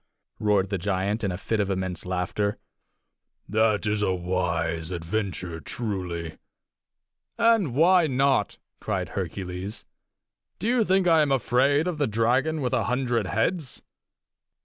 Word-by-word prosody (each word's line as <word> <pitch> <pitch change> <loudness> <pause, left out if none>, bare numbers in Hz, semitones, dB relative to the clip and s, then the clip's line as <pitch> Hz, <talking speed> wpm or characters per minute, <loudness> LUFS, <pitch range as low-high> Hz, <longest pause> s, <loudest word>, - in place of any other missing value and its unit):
roared 100 -2 +2
the 100 - -1
giant, 100 +3 -1
in 100 - 0
a 90 - -4
fit 110 +3 -2
of 100 -1 0
immense 95 -1 -3
laughter. 95 +3 -1 0.9
"That 110 0 +2
is 105 0 0
a 100 - +2
wise 85 -2 -1
adventure, 90 -1 -3
truly!" 90 -6 -4 1.0
"And 225 - +3
why 170 +2 +5
not?" 135 -5 +1 0.2
cried - - -2
Hercules. 95 +2 -5 0.7
"Do 215 - -3
you 240 -1 +3
think 190 -1 +2
I 165 -2 +6
am 145 -2 +1
afraid 135 +4 +2
of 170 -4 -3
the 145 - +2
dragon 130 +8 +1
with 125 -2 -1
a - - +1
hundred 125 -4 0
heads?" 130 - -1
105 Hz, 135 wpm, -26 LUFS, 95-135 Hz, 1.0 s, I